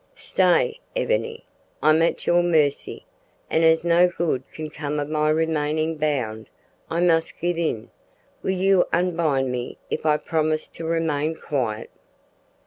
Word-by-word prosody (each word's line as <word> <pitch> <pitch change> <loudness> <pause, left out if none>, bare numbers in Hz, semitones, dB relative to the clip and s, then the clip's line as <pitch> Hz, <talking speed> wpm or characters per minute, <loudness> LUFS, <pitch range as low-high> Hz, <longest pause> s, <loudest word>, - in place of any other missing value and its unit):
"Stay, 485 -1 +1 0.2
Ebony, 470 -2 -1 0.4
I'm 155 +2 +5
at 165 - +1
your 175 0 +4
mercy, 155 -5 0 0.5
and 160 - +2
as 160 0 +4
no 170 +1 +5
good 170 -7 -1
can 155 -1 -7
come 150 0 -3
of 145 - -2
my 155 0 +1
remaining 155 0 0
bound, 130 -8 -2 0.4
I 170 +1 -1
must 165 -2 +2
give 175 0 -1
in. 135 -10 -2 0.5
Will - - -3
you 190 0 +3
unbind 165 -7 +1
me 125 -1 -4
if - - -2
I 150 -1 +3
promise 155 0 -1
to 165 - -8
remain 160 -1 0
quiet?" 120 -9 -3
160 Hz, 140 wpm, -23 LUFS, 150-170 Hz, 0.5 s, I'm